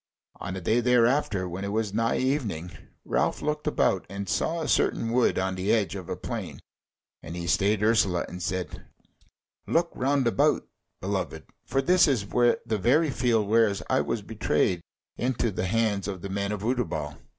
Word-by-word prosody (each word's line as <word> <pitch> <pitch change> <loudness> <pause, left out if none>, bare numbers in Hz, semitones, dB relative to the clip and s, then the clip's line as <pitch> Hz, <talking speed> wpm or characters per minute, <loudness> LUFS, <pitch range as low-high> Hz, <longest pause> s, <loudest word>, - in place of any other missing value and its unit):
On 95 - -5
a 95 - -5
day 110 +7 +2
thereafter 120 -5 +2
when 90 +3 -5
it 100 - -3
was 110 -1 -1
nigh 115 +1 +1
evening, 115 - -1 0.3
Ralph - - 0
looked 150 0 -2
about, - - +1
and 100 +1 -5
saw 165 - 0
a 155 - -3
certain 115 - +1
wood 125 0 +2
on 95 0 0
the 95 +2 -1
edge 105 -3 +1
of 95 -4 -7
a - - -2
plain, - - -6 0.6
and 85 - -8
he 85 -1 -4
stayed 100 +4 +2
Ursula, 105 -5 +2
and 90 +1 -8
said: 90 0 -3 0.8
"Look 170 +1 +1
round 135 +1 +1
about, 115 -5 +2 0.3
beloved; 95 -5 -3 0.2
for 135 0 0
this 180 +2 +5
is 125 -8 +1
the 115 -1 +1
very 145 - +3
field 115 -4 +1
whereas 110 -2 +3
I - - +3
was - - -2
betrayed 90 -2 0 0.4
into 120 -2 0
the 90 -1 -2
hands 105 -2 0
of 95 -3 -5
the 100 - -4
men 100 +1 -2
of 105 -1 -4
Utterbol." 105 - -2
105 Hz, 175 wpm, -27 LUFS, 95-125 Hz, 0.8 s, this